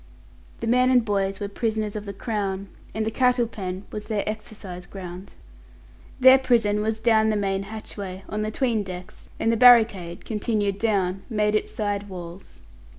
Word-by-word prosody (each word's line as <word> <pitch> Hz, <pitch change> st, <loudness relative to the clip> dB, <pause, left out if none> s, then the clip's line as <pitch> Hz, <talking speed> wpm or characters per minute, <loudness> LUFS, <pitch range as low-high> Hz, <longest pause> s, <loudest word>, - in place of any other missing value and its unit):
The -, -, -2 dB
men 250 Hz, +2 st, +4 dB
and 250 Hz, -3 st, +4 dB
boys 195 Hz, -2 st, 0 dB
were 205 Hz, -, -3 dB
prisoners 215 Hz, 0 st, -2 dB
of 210 Hz, 0 st, -5 dB
the 200 Hz, -, -5 dB
Crown, 200 Hz, -2 st, -3 dB, 0.3 s
and 220 Hz, 0 st, -1 dB
the 220 Hz, -, -1 dB
cattle 250 Hz, 0 st, +3 dB
pen 190 Hz, -3 st, -6 dB
was 210 Hz, 0 st, -6 dB
their 215 Hz, -2 st, -2 dB
exercise 210 Hz, -4 st, -6 dB
ground. 185 Hz, 0 st, -9 dB, 0.8 s
Their 260 Hz, +1 st, +8 dB
prison 225 Hz, -5 st, +2 dB
was 220 Hz, +1 st, -1 dB
down 220 Hz, -1 st, +3 dB
the 215 Hz, -, +1 dB
main 195 Hz, -1 st, 0 dB
hatchway, 200 Hz, -3 st, -7 dB
on 210 Hz, +1 st, -3 dB
the 215 Hz, -, -1 dB
'tween 230 Hz, -1 st, 0 dB
decks, 185 Hz, -2 st, -8 dB
and 225 Hz, -, +2 dB
the 230 Hz, -, +1 dB
barricade, 220 Hz, -8 st, +5 dB
continued 210 Hz, -2 st, -1 dB
down, 195 Hz, -4 st, 0 dB
made 210 Hz, -2 st, +1 dB
its 215 Hz, -, 0 dB
side 205 Hz, -1 st, -3 dB
walls. 180 Hz, 0 st, -10 dB
210 Hz, 170 wpm, -24 LUFS, 195-225 Hz, 0.8 s, Their